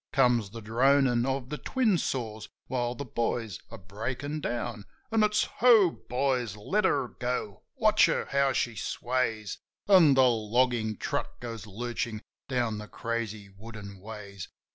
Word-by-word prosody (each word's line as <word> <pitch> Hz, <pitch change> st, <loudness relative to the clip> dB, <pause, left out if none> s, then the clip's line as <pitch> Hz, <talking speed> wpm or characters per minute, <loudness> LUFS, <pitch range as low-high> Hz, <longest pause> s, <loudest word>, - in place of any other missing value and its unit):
Comes 125 Hz, -6 st, +3 dB
the 115 Hz, +2 st, -9 dB
dronin' 125 Hz, +2 st, +3 dB
of 135 Hz, -1 st, -2 dB
the 150 Hz, -, -4 dB
twin 245 Hz, -7 st, +1 dB
saws 110 Hz, -6 st, -3 dB, 0.2 s
while 120 Hz, -1 st, -2 dB
the 140 Hz, -, -5 dB
boys 115 Hz, -3 st, -2 dB
are 115 Hz, -, -8 dB
breakin' 125 Hz, -, -4 dB
down. 120 Hz, -4 st, -3 dB, 0.3 s
An' 225 Hz, 0 st, +3 dB
it's: 210 Hz, 0 st, +3 dB, 0.2 s
Ho, 225 Hz, -8 st, +7 dB
boys! 125 Hz, -6 st, -1 dB
Let 190 Hz, -, 0 dB
her 140 Hz, -7 st, +2 dB
go! 120 Hz, -6 st, -4 dB
Watch -, -, +5 dB
her, -, -, 0 dB
how 140 Hz, 0 st, +3 dB
she 120 Hz, -3 st, -1 dB
sways! 115 Hz, -6 st, -2 dB, 0.3 s
An' 175 Hz, -8 st, +7 dB
the 130 Hz, -, +6 dB
loggin' 115 Hz, -1 st, +1 dB
truck -, -, -3 dB
goes 115 Hz, -4 st, -7 dB
lurchin' 115 Hz, +1 st, -4 dB, 0.3 s
down 120 Hz, -5 st, 0 dB
the 105 Hz, -, -8 dB
crazy 110 Hz, -3 st, -4 dB
wooden 100 Hz, -2 st, -10 dB
ways. 100 Hz, -2 st, -8 dB
120 Hz, 145 wpm, -28 LUFS, 110-135 Hz, 0.3 s, Ho